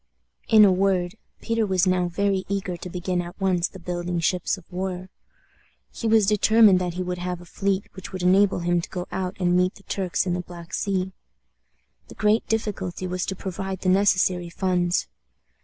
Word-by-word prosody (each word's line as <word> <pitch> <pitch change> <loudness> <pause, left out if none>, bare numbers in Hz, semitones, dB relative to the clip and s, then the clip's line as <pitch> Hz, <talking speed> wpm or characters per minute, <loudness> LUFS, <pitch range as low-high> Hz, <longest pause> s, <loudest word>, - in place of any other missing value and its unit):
In 215 -2 +7
a 195 - +5
word, 185 -1 +1 0.3
Peter 230 -1 0
was 190 -3 +2
now 185 -1 +2
very 195 +2 0
eager 195 -2 -2
to 175 +1 -8
begin 180 0 -2
at 175 +2 -9
once 185 -3 +1
the - - -12
building 175 -1 -3
ships 180 +3 0
of 185 - -14
war. 185 0 -4 0.8
He 230 - -4
was 220 -2 +5
determined 210 -1 +5
that 180 -2 -3
he 185 - -2
would 180 0 -4
have 180 0 -3
a 175 - -13
fleet 195 +2 -1
which 190 - -9
would 185 -1 -5
enable 190 0 +4
him 175 0 +1
to - - -8
go 180 -1 -4
out 185 0 -3
and 175 -1 +2
meet 180 +1 +2
the 195 - -17
Turks 190 -3 -1
in 180 - 0
the 180 - -1
Black 175 -1 -11
Sea. 190 -2 -1 1.0
The - - -13
great 215 +1 +2
difficulty 195 -5 -2
was 180 0 -3
to 190 - -2
provide 190 0 -5
the 185 - +1
necessary 185 -2 +2
funds. 180 0 0
185 Hz, 190 wpm, -24 LUFS, 180-195 Hz, 1.0 s, In